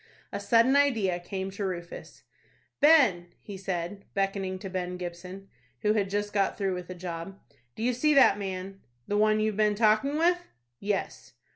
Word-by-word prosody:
A - - -2
sudden 235 +3 +4
idea 225 -11 +2
came 190 +2 -5
to 200 +1 -5
Rufus. 175 -3 -6 0.6
"Ben," 255 - +5
he 205 - -9
said, 190 +1 -4
beckoning 195 -1 -1
to 195 - -7
Ben 180 -1 -4
Gibson, 180 +2 -8 0.4
who 210 0 +3
had 200 -3 0
just 205 +1 -2
got 200 -2 +1
through 195 -2 -1
with 180 -1 -6
a 185 - -6
job, 175 +2 -7 0.4
"do - - -5
you 250 +1 +2
see 300 +5 +2
that 260 -7 +6
man?" 195 0 -5 0.3
"The 205 - -1
one 215 0 +3
you've 215 -1 0
been 210 -1 +3
talking 220 +7 +2
with?" 350 +2 +3 0.4
"Yes." 200 0 -3
195 Hz, 170 wpm, -28 LUFS, 185-215 Hz, 0.6 s, that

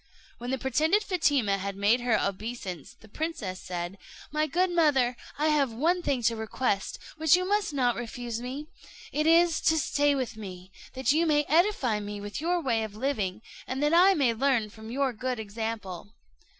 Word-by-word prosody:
When 245 +1 -5
the 265 - 0
pretended 310 - +2
Fatima 285 - +1
had 200 +1 -4
made 205 +5 +3
her 240 -2 +2
obeisance, 195 - -4
the 220 - -16
princess 215 - -4
said, 175 +1 -5 0.3
"My 305 +1 +1
good 360 +5 +1
mother, 280 -8 +3 0.2
I 305 +2 +2
have 285 -5 +2
one 330 +10 +1
thing 270 -7 -1
to 230 +1 +2
request, 220 -2 -2 0.2
which 315 +1 +5
you 365 0 -2
must 410 -2 +1
not 250 -4 +1
refuse 240 0 -5
me; 260 +4 -5 0.5
it 305 +1 0
is, 335 0 +4
to 320 - +3
stay 290 -1 +2
with 255 -4 -3
me, 185 -3 -9 0.2
that 260 -1 +2
you 325 +3 +2
may 295 -1 +3
edify 315 - +2
me 205 0 -6
with 205 +6 -6
your 350 +2 +1
way 230 -4 +1
of 210 -2 -6
living, 215 -5 -2 0.2
and 265 +2 -2
that 295 +2 +2
I 375 +3 +6
may 265 -7 +2
learn 235 -3 +1
from 220 +1 -11
your 265 +1 0
good 255 +2 -3
example." 215 -3 -5
255 Hz, 185 wpm, -28 LUFS, 220-305 Hz, 0.5 s, I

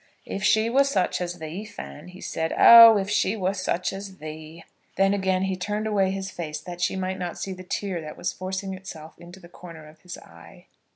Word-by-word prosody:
"If 195 - -5
she 220 +1 +3
were 265 +4 +4
such 235 -10 -1
as 175 0 -4
thee, 160 +5 -7
Fan," 180 -7 -10
he 180 +1 -13
said. 160 0 -3
"Oh, 230 -2 +10
if 195 -1 -2
she 205 0 +1
were 190 -1 -1
such 185 -2 -2
as 195 0 -8
thee!" 155 +1 -10 0.3
Then 195 +1 +3
again 190 -2 0
he 190 -1 -1
turned 210 +3 -3
away 200 -3 +1
his 190 0 -4
face 155 -4 -6
that 175 -1 -9
she 175 - 0
might 190 0 -3
not 175 -2 -5
see 195 - -5
the 185 - -10
tear 185 -1 -4
that 155 -1 -9
was 180 - -3
forcing 190 +1 -5
itself 165 -4 -10
into 175 +2 -13
the 175 - -14
corner 165 -3 -12
of 155 +1 -18
his 180 0 -9
eye. 85 0 -16
185 Hz, 220 wpm, -24 LUFS, 170-195 Hz, 0.3 s, Oh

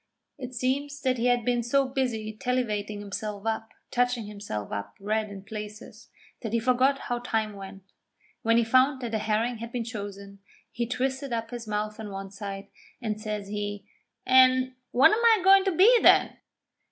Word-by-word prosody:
It 255 -1 -7
seems 280 +4 -1
that 255 -3 0
he 240 - +2
had 245 -2 +2
been 245 -1 +1
so 270 +3 +2
busy 245 -5 -2
tallivating 215 -4 -2
himself 205 0 -5
up, 225 0 -2 0.2
touching 245 -2 +1
himself 200 - -6
up 100 0 -5
red 215 +1 -1
in 195 -1 -9
places, 210 0 -9 0.3
that 225 -2 -5
he 230 - +3
forgot 255 +4 +2
how 245 0 -2
time 220 -3 -1
went. 195 -1 -10 0.6
When 230 +1 +3
he 235 - +4
found 260 +4 +3
that 240 -2 -4
the 220 - 0
herring 225 +3 0
had 230 +1 -7
been 240 -1 -2
chosen, 200 -3 -8 0.3
he 235 -1 -2
twisted 265 +2 -2
up 230 0 -3
his 240 -2 -7
mouth 210 0 -3
on 215 -1 -6
one 195 0 -7
side, 195 -1 -7 0.3
and 215 -3 -3
says 210 -2 -4
he: 205 -1 -4 0.4
'An' 255 0 +5
what 265 +8 +6
am 445 +2 +1
I 450 -4 +6
goin' 390 +1 +6
to 385 - +2
be 425 +8 +6
then?' - - +5
230 Hz, 180 wpm, -27 LUFS, 210-255 Hz, 0.6 s, what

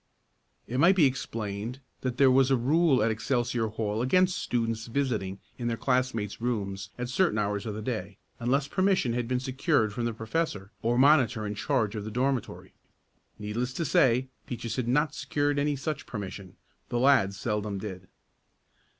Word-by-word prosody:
It 125 +2 -3
might 175 +5 +6
be 170 -6 +5
explained 115 -2 -3 0.2
that 125 -1 -3
there 135 -1 +6
was 130 0 +4
a 135 - +4
rule 140 0 +3
at 115 - +2
Excelsior 120 0 0
Hall 110 0 -2
against 185 +8 +3
students 115 -1 -1
visiting 115 -7 -1 0.2
in 120 - -2
their 115 -1 -1
classmates' 125 -6 -1
rooms 100 -5 -2
at 125 0 -3
certain 150 - +1
hours 105 +1 -1
of 105 - -3
the 110 - -5
day, 105 -5 -4 0.2
unless 135 +4 +1
permission 185 -7 +1
had 120 -1 -1
been 125 0 0
secured 130 - +1
from 120 +2 -2
the 115 - -1
professor 110 -3 -2
or 120 +1 +1
monitor 130 -5 +4
in 105 - -3
charge 110 -1 0
of 105 - -4
the 110 - -5
dormitory. 125 +2 -2 0.6
Needless 115 +4 -3
to 165 - -2
say 130 -1 +3 0.2
Peaches 115 -2 -4
had 125 -2 -1
not 150 +4 +2
secured 145 -1 0
any 145 0 +1
such 145 +2 -4
permission 100 -3 -7 0.3
the 120 - -1
lads 120 -7 +4
seldom 105 -2 -2
did. 95 -2 -7
120 Hz, 170 wpm, -28 LUFS, 105-135 Hz, 0.6 s, might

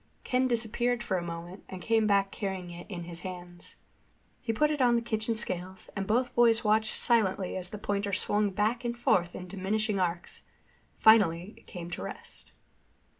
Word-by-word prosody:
Ken 255 +1 +2
disappeared 235 +1 0
for 190 - 0
a - - -2
moment 170 +2 -7
and 185 - -6
came 225 +2 +2
back 200 -1 +3
carrying 190 -3 -4
it 175 +4 -10
in 175 -4 -5
his 170 0 -7
hands. 175 -1 -9 0.7
He 230 - -1
put 300 +7 +2
it 295 -2 -1
on 240 -1 +5
the 235 - +2
kitchen 225 0 -1
scales, 185 -4 -4
and 195 -1 -2
both 245 +4 +1
boys 235 -1 +4
watched 215 0 +2
silently 200 -5 +2
as 185 -1 -4
the 210 - -6
pointer 200 0 -1
swung 205 +1 +1
back 215 +5 0
and 235 0 -2
forth 175 -7 +2
in 180 - -7
diminishing 200 +2 -1
arcs. 175 -1 -2 0.6
Finally 200 -4 +5
it - - -21
came 175 -2 -7
to - - -4
rest. - - -9
205 Hz, 180 wpm, -29 LUFS, 180-225 Hz, 0.7 s, on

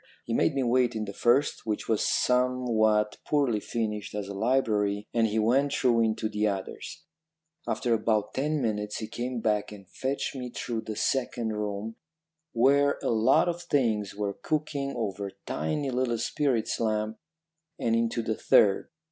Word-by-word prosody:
He 115 - -3
made 145 - +2
me 135 - +1
wait 125 -1 +2
in 110 -1 -2
the 100 - -7
first, 125 +7 +2
which 105 -1 -2
was 110 -2 +1
somewhat 120 -4 +2
poorly 140 -8 +1
furnished 105 -2 -3
as 105 -2 -3
a 100 - -6
library, 105 -3 +1
and 115 -1 +3
he 110 +1 -2
went 130 +6 +3
through 120 -4 +3
into 110 0 +1
the 105 0 0
others. 95 -2 -5 0.6
After 120 -2 0
about 110 -2 +1
ten 150 +1 0
minutes 105 -2 -2
he 110 - -4
came 120 +1 -4
back 105 -2 0
and 100 -2 -11
fetched 135 +6 -3
me 125 -2 -5
through 120 -1 -4
the 110 - -3
second 120 -1 -1
room, 105 +1 -4 0.5
where 140 +4 +3
a - - +1
lot 115 +8 +4
of 175 0 -2
things 110 - 0
were 100 -1 -2
cooking 145 -1 -2
over 100 -4 -3
tiny 130 - -2
little 125 -2 0
spirit 125 -1 0
lamps, 110 -1 -1 0.6
and 115 0 +1
into 115 0 0
the 110 0 0
third. 100 -2 +4
115 Hz, 165 wpm, -28 LUFS, 105-130 Hz, 0.6 s, lot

